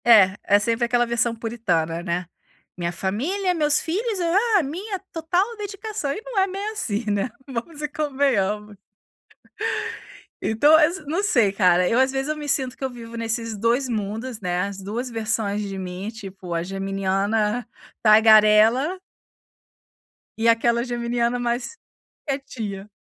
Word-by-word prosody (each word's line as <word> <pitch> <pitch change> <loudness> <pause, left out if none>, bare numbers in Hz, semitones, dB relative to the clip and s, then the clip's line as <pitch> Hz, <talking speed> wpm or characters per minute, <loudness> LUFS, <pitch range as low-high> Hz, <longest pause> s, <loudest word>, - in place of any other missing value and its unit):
É, 205 -5 +7
é 205 +1 +4
sempre 230 +3 +1
aquela 240 0 +2
versão 235 0 0
puritana, 180 -8 -1
né: 175 0 -2 0.5
"Minha 175 -1 -2
família, 290 - -1
meus 300 -3 +2
filhos, 405 +5 -2 0.4
ah, 365 - +2
minha 375 +8 -4
total 355 +7 0
dedicação". 410 -6 -4
E 420 - -4
não - - -1
é 385 - +3
bem 395 +2 -4
assim, 230 - -2
né, 205 +3 0 0.2
vamos 275 +4 -6
e 300 - -1
convenhamos. 260 -9 0 1.7
Então, 290 +8 +4
ass 320 +2 +2
não 335 +7 -1
sei, 235 - +3
cara, 180 -2 +3
eu, 235 - +2
às 265 0 +3
vezes, 270 +2 -2
eu 305 - -1
me 300 -1 -6
sinto 265 -3 0
que - - -8
eu - - -1
vivo 235 -2 -10
nesses 230 -1 -2
2 235 +5 +1
mundos, 220 +2 -3
né, 180 -3 -1
as 200 0 -3
2 215 +6 -4
versões 220 -2 -1
de 195 -2 -5
mim, 185 +2 -5
tipo, 195 -5 -8
a 165 0 -1
geminiana 195 +4 -1 0.4
tagarela 220 - +6 1.4
e 225 +1 +1
aquela 235 +1 +3
geminiana 240 0 -1
mais 240 - -2 0.5
quietinha. 225 -8 -5
235 Hz, 145 wpm, -23 LUFS, 205-285 Hz, 1.7 s, É